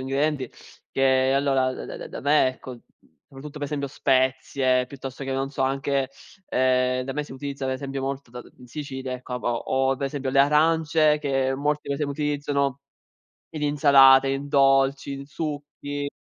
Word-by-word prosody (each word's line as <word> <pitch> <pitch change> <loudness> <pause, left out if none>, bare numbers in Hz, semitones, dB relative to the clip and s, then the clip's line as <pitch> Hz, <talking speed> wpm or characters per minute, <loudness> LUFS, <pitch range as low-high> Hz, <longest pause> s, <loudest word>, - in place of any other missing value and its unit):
ingredienti 135 0 -1 0.4
che 130 0 +3
allora 135 -2 +2
da - - -7
da - - -7
da - - -8
me, 145 0 +4
ecco, 130 -1 -6 0.5
soprattutto 145 +2 -10
per - - -8
esempio 140 -1 -3
spezie, 130 -1 +1
piuttosto 135 0 -8
che, 135 - -3
non 135 +1 -2
so, 135 - -2
anche 135 0 0 0.4
ehm, 130 0 +2
da 135 +1 -5
me 150 +2 -3
si - - -11
utilizza, 140 +1 -6
per 130 - -1
esempio, 135 0 -5
molto 135 -1 -4
da 125 +1 -8
d - - -16
in 125 - -15
Sicilia, 130 -1 -6
ecco, 125 0 -6
ha - - -2
ho 120 -1 -1 0.3
ho 135 - 0
per 140 +1 -2
esempio 135 -1 -3
le 135 - +1
arance, 155 +1 +3
che 135 -2 0
molti 150 +1 -1
per 140 - 0
esempio 145 0 -2
utilizzano 145 -2 -1 0.8
in 155 - -4
insalate, 140 -2 +6
in 135 +1 -3
dolci, 135 0 +3
in 140 0 -8
succhi. 145 -1 -5
135 Hz, 180 wpm, -24 LUFS, 130-145 Hz, 0.8 s, insalate